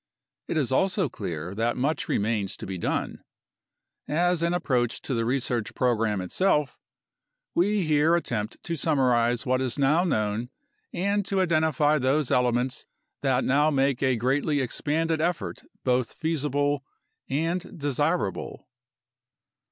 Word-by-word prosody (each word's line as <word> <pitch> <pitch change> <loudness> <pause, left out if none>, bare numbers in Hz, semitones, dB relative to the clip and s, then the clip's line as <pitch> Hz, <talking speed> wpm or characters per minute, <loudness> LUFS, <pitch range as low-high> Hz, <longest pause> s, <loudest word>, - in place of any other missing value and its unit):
It 165 - -1
is 135 -5 0
also 185 +3 +2
clear 85 -5 -5
that 115 +3 -1
much 145 +5 -1
remains 105 -2 0
to - - -7
be 95 -2 -5
done. - - -2 0.8
As 175 +3 +1
an 170 0 +1
approach 125 -9 0
to 135 - -3
the 115 -2 0
research 120 -3 -1
program 115 -5 +1
itself, 150 - 0 0.7
we 200 +3 +2
here 155 +2 +3
attempt 115 -10 -2
to 170 - -3
summarize 125 -5 +2
what 130 0 +1
is 130 -1 -1
now 145 +5 +3
known 110 - -1 0.4
and 200 +3 0
to 195 - 0
identify 155 -4 +2
those 135 +2 +1
elements 125 +1 +1 0.3
that 130 -2 +2
now 145 +4 +3
make 135 -3 +1
a 130 -2 +3
greatly 140 +5 +1
expanded 155 +5 0
effort 125 - -2 0.2
both 125 -2 +1
feasible 145 -3 0 0.5
and 165 +7 -2
desirable. 145 - -1
135 Hz, 130 wpm, -26 LUFS, 120-160 Hz, 0.8 s, here